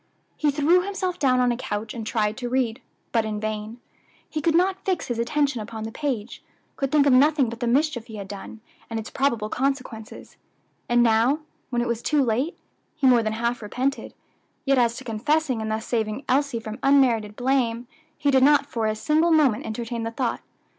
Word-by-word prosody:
He 300 - +1
threw 300 +5 +3
himself 375 -2 -3
down 255 -3 +3
on 250 -1 +3
a - - 0
couch 215 -2 -4
and 225 -2 -6
tried 215 -2 0
to 245 -2 -4
read, 250 -1 0 0.3
but 230 -2 +2
in 215 -1 -3
vain; 215 +2 -4 0.5
he 310 - -4
could 325 +1 +2
not 375 +2 +2
fix 370 -3 -1
his 235 -1 -2
attention 275 0 0
upon 220 0 -7
the 220 - -5
page 245 -5 -4 0.3
could 275 -1 -2
think 295 -2 +4
of 280 - +5
nothing 280 -1 +4
but 230 0 -8
the 240 - -1
mischief 260 -2 +1
he 220 - -9
had 200 -2 -6
done, 205 +2 -9 0.3
and 225 -1 -3
its 220 - -8
probable 235 -6 0
consequences; 255 -3 -4 0.5
and 240 0 +4
now, 235 +6 +3 0.3
when 240 -1 0
it - - -3
was 235 -1 -2
too 295 +1 +2
late, 255 +8 -1 0.4
he 305 -3 -1
more 250 -3 +6
than 215 -1 -2
half 235 +2 -1
repented; 255 +6 -3 0.5
yet 275 -1 +3
as 235 -1 +2
to - - -8
confessing 255 +2 0
and 220 - -3
thus 220 +1 -2
saving 225 +2 -2
Elsie 275 -2 +1
from 220 -1 -7
unmerited 245 -7 +3
blame, 245 -2 0 0.3
he 290 -2 +1
did 265 -1 +4
not 290 +2 +5
for 230 -5 -2
a 215 - 0
single 310 +9 +2
moment 290 -9 +3
entertain 230 +1 -4
the 225 - -2
thought. 235 0 -2
245 Hz, 200 wpm, -24 LUFS, 225-280 Hz, 0.5 s, more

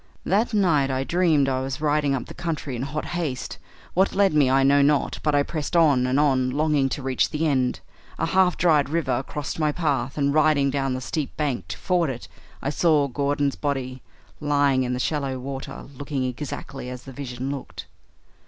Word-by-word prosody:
That 210 +6 +2
night 165 - +2
I 130 0 0
dreamed 160 -3 +2
I 130 -1 0
was 135 +1 -4
riding 150 -2 +1
up 125 - -4
the - - -10
country 155 -5 -4
in 120 - -4
hot 140 +3 -3
haste; 160 -8 -4 0.3
what 190 +2 +2
led 195 -3 +3
me 145 -4 +4
I 135 +1 +4
know 140 +1 +5
not, 145 0 +2
but 150 -1 +1
I 145 - +4
pressed 155 +2 -4
on 145 -7 +4
and 130 +2 +2
on, 130 -4 +2
longing 145 0 +1
to 135 - -4
reach 130 -1 +1
the 155 +1 -1
end. 130 -4 +1 0.4
A - - 0
half 185 +1 +3
dried 155 -5 +3
river 165 -3 0
crossed 145 +2 -5
my 155 -1 +2
path, 145 -5 -1
and, 140 -1 +1
riding 150 -3 +3
down 135 -1 -1
the 130 - -4
steep 145 +2 -4
bank 130 - -2
to 90 - -6
ford 175 -5 +1
it, 125 -2 -6 0.4
I 140 - 0
saw 150 -3 +3
Gordon's 140 +1 0
body 130 -3 -3 0.4
lying 145 -3 +2
in 125 -1 -1
the 125 - -2
shallow 135 -2 -1
water 135 +1 -6
looking 140 0 -3
exactly 130 0 -5
as 125 -1 -7
the 135 - -10
vision 130 0 -5
looked. 140 -2 -7
140 Hz, 200 wpm, -24 LUFS, 130-155 Hz, 0.4 s, know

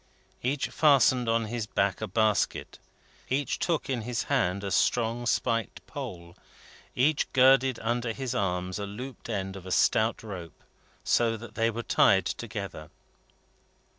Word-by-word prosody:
Each 135 +3 -1
fastened 130 -5 +4
on 115 0 +2
his 115 0 -4
back 100 -2 0
a 110 - -2
basket; 110 +1 0 0.5
each 135 +1 -1
took 170 -2 0
in 130 -4 -1
his 120 +1 -2
hand 100 -8 0
a 100 - -3
strong 120 +2 +1
spiked 115 -2 -1
pole; 85 0 -8 0.6
each 140 +4 +2
girded 130 -1 +5
under 120 +1 -1
his 130 +1 -4
arms 90 -4 -2
a 100 - -4
looped 125 +5 -8
end 95 -3 -3
of 95 -1 -9
a - - -6
stout 110 +5 +2
rope, 90 -7 -9 0.4
so 115 -1 +2
that 110 -1 -11
they 115 0 +1
were 115 +1 -4
tied 95 -3 +4
together. 100 -9 -5
115 Hz, 145 wpm, -28 LUFS, 100-125 Hz, 0.6 s, girded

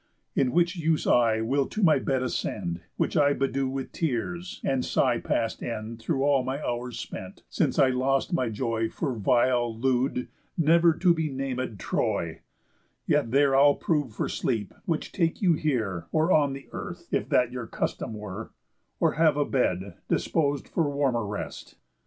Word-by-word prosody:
In 130 -2 +2
which 175 +3 +2
use 160 -2 0
I 115 -2 +3
will 135 +4 +1
to 215 - -3
my 160 -4 +5
bed 130 -2 0
ascend, 85 -8 -3 0.2
Which - - 0
I 145 -2 +4
bedew 135 -1 0
with 135 0 -4
tears, 170 +5 -3
and 135 -2 +1
sigh 125 -3 +2
past 115 -1 -1
end 115 0 -5
Through 135 +1 0
all 140 -2 +3
my 130 +2 -3
hours 120 -3 -3
spent, 95 -4 -8
since - - 0
I 135 - +5
lost 135 +6 0
my 130 -8 +1
joy 115 0 -1
For 140 -5 -2
vile, 120 0 +2
lewd, 125 +1 0 0.3
never 170 +1 +5
to 180 0 +4
be 160 -2 -1
naméd, 130 -4 -3
Troy, - - -1 0.7
Yet 115 - +2
there 135 +2 +4
I'll 145 +1 +6
prove 145 -7 0
for - - -1
sleep, 110 -6 -2
which 165 -3 -2
take 165 -3 0
you 180 -4 +4
here, 110 - -1
Or 160 +3 +2
on 145 -4 +4
the 135 0 -9
earth, - - -7
if - - -1
that 125 -1 +3
your 125 -2 -5
custom 110 - -3
were, 105 +1 -7 0.5
Or - - +3
have 155 -2 +3
a 145 - +2
bed, 100 -7 -1
dispos'd 145 -3 0
for 160 -4 0
warmer 135 -6 0
rest." 100 - -6
135 Hz, 170 wpm, -27 LUFS, 115-150 Hz, 0.7 s, I'll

